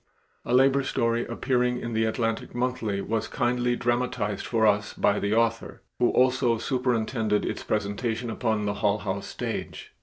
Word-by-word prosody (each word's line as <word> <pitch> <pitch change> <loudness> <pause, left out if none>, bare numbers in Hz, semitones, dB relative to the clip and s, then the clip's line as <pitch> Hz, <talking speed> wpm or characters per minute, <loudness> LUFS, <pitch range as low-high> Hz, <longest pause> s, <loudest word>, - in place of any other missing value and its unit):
A - - -4
labor 135 +2 +5
story 120 -3 0
appearing 125 +1 0
in 115 -1 -5
the 110 0 +2
Atlantic 115 +1 -2
Monthly 120 -5 -1
was 110 +1 -2
kindly 120 -1 0
dramatized 120 -4 -1
for 115 -2 +2
us 105 -1 +2
by - - +2
the 100 +2 0
author 115 0 0 0.2
who 120 - +4
also 125 -2 +3
superintended 115 -4 0
its - - -3
presentation 110 +3 -2
upon 110 -2 -1
the 100 - 0
Hull 105 0 +1
House 100 -1 -4
stage. - - -5
115 Hz, 155 wpm, -26 LUFS, 110-125 Hz, 0.2 s, labor